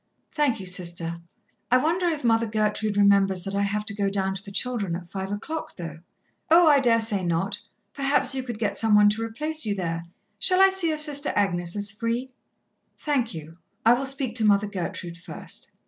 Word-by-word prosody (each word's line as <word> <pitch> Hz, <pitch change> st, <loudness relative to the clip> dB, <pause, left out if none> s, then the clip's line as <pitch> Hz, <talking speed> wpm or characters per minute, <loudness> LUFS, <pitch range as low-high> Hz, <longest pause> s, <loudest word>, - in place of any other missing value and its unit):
"Thank 290 Hz, -7 st, +1 dB
you, 190 Hz, -, -7 dB
Sister. 170 Hz, -2 st, -4 dB, 0.5 s
I 255 Hz, -, +5 dB
wonder 335 Hz, +6 st, +1 dB
if 315 Hz, -5 st, -1 dB
Mother 230 Hz, -1 st, +3 dB
Gertrude 215 Hz, -1 st, 0 dB
remembers 200 Hz, -2 st, +4 dB
that 195 Hz, -, -3 dB
I 200 Hz, -, +1 dB
have 205 Hz, +1 st, -1 dB
to 215 Hz, -, -5 dB
go 200 Hz, -1 st, 0 dB
down 195 Hz, -1 st, -1 dB
to 195 Hz, -, -7 dB
the 205 Hz, -, -10 dB
children 205 Hz, -4 st, -1 dB
at 175 Hz, 0 st, -7 dB
five 190 Hz, +2 st, -5 dB
o'clock, 315 Hz, +11 st, -5 dB
though?" 165 Hz, -3 st, -7 dB, 0.5 s
"Oh, 335 Hz, +1 st, +7 dB
I 290 Hz, -2 st, +6 dB
dare 235 Hz, -3 st, +3 dB
say 215 Hz, -4 st, -1 dB
not. 170 Hz, +3 st, -1 dB, 0.3 s
Perhaps 275 Hz, 0 st, +2 dB
you 265 Hz, -, -1 dB
could 240 Hz, -3 st, -6 dB
get 210 Hz, -2 st, -1 dB
some 220 Hz, -2 st, +3 dB
one 210 Hz, 0 st, +7 dB
to 215 Hz, +2 st, -2 dB
replace 300 Hz, +8 st, -3 dB
you 205 Hz, -2 st, -1 dB
there. 165 Hz, -3 st, -3 dB, 0.3 s
Shall 370 Hz, -1 st, +3 dB
I 385 Hz, 0 st, +8 dB
see 380 Hz, -3 st, +1 dB
if 310 Hz, -1 st, 0 dB
Sister 290 Hz, -1 st, -1 dB
Agnes 175 Hz, -3 st, 0 dB
is 205 Hz, 0 st, -1 dB
free?" 230 Hz, +5 st, -3 dB, 0.7 s
"Thank 255 Hz, -, -1 dB
you, 160 Hz, +1 st, -9 dB, 0.3 s
I 230 Hz, -, +7 dB
will 265 Hz, +3 st, -1 dB
speak 270 Hz, -3 st, -2 dB
to 225 Hz, -, +3 dB
Mother 205 Hz, -1 st, +4 dB
Gertrude 180 Hz, -3 st, -5 dB
first." 180 Hz, -, -6 dB
210 Hz, 205 wpm, -25 LUFS, 195-260 Hz, 0.7 s, I